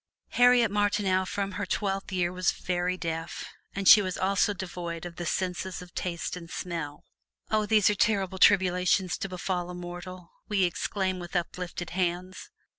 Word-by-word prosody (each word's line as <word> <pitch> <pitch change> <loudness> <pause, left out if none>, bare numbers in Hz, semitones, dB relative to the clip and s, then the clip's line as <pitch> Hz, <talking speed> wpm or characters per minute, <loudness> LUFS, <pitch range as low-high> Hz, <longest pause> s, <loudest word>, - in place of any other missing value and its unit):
Harriet 245 -3 +5
Martineau 200 -2 +1
from 200 +1 -2
her 200 +2 -3
twelfth 195 -1 -2
year 180 -1 0
was 185 0 +2
very 180 0 -1
deaf, 165 -1 -4 0.3
and 195 -1 -1
she 210 - +10
was 185 -2 -3
also 195 +2 +2
devoid 175 -3 -5
of 170 -1 -8
the 175 - -4
senses 185 +1 -2
of 180 -1 -12
taste 170 -1 -3
and 170 -2 -9
smell. 165 -6 -5 0.5
"Oh, 215 -1 +2
these 215 -3 +4
are 210 - +4
terrible 195 -3 +1
tribulations 185 -1 +4
to 195 - -3
befall 180 -1 -3
a 180 - -6
mortal!" 175 0 -8 0.2
we 200 -2 +2
exclaim 185 +1 -1
with 175 +1 -8
uplifted 175 0 -3
hands. 180 +1 -2
185 Hz, 165 wpm, -28 LUFS, 175-195 Hz, 0.5 s, she